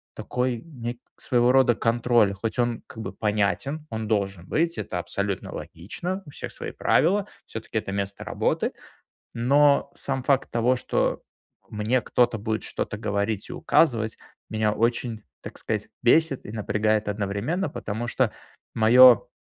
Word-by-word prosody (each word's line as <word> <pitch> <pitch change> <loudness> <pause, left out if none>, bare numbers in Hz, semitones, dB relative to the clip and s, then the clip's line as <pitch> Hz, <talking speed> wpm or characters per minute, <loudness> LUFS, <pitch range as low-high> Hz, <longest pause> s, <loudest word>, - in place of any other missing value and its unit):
такой 125 -1 -1
нек 120 -7 -6 0.2
своего 120 0 +2
рода 130 -3 +5
контроль. 115 -3 +2
Хоть 110 +4 -4
он 120 -1 0
как - - -14
бы - - -6
понятен, 110 +9 -1
он 110 -1 -4
должен 95 -4 -1
быть. 170 +1 0
Это 90 - -3
абсолютно 100 +1 -3
логично. 175 - -5
У 145 - -12
всех - - -7
свои - - -6
правила, 195 +5 +2 0.2
всё-таки 110 0 -5
это 100 -2 -3
место 100 0 -3
работы. - - 0 0.6
Но 140 +4 +3
сам 135 -2 -3
факт 135 0 +2
того, 120 +2 +2
что - - -1 0.5
мне 110 +4 +1
кто-то 120 -2 +2
будет 110 +1 -2
что-то 105 - -4
говорить 100 -1 -2
и - - -5
указывать, 115 -8 +2 0.3
меня 110 -1 +1
очень, 115 -1 -1 0.2
так - - -9
сказать, - - -3
бесит 140 +2 +3
и 105 - -8
напрягает 110 0 0
одновременно. 105 - -1
Потому 115 -1 -4
что - - +1 0.4
моё 120 +1 +7
115 Hz, 145 wpm, -25 LUFS, 105-130 Hz, 0.6 s, моё